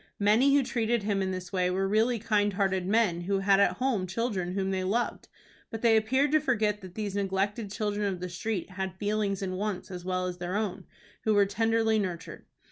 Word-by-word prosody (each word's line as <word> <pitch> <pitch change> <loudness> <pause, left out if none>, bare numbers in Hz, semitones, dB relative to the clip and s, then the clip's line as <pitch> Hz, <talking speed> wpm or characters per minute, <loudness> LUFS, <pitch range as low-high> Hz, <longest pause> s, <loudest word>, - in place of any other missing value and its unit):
Many 225 +7 +4
who 285 - +4
treated 235 -2 0
him 200 -1 0
in 190 - -1
this 185 -1 -5
way 180 -1 +1
were 190 +1 0
really 220 +4 +2
kind 205 -2 +1
hearted 190 -2 0
men 205 -5 +2
who 195 +3 0
had 195 0 +3
at 200 -3 +4
home 225 -4 -1
children 190 -3 -2
whom 195 0 -1
they 190 -1 -1
loved, 225 +6 -1 0.4
but 225 0 -7
they 230 -1 +5
appeared 260 +6 +2
to 310 - +5
forget 215 -7 0
that 185 -2 -11
these 210 -3 -3
neglected 200 +2 -1
children 210 0 -1
of 185 - -5
the 180 - -4
street 185 +2 -4
had 190 0 -4
feelings 205 -1 -1
and 185 -1 -3
wants 205 -3 -3
as 180 -1 -6
well 185 0 -1
as 180 -1 -5
their 175 +2 -3
own, 205 -3 -2 0.4
who 215 -1 +2
were 200 -1 +5
tenderly 225 +2 +1
nurtured. 175 -4 -5
200 Hz, 210 wpm, -28 LUFS, 185-220 Hz, 0.4 s, they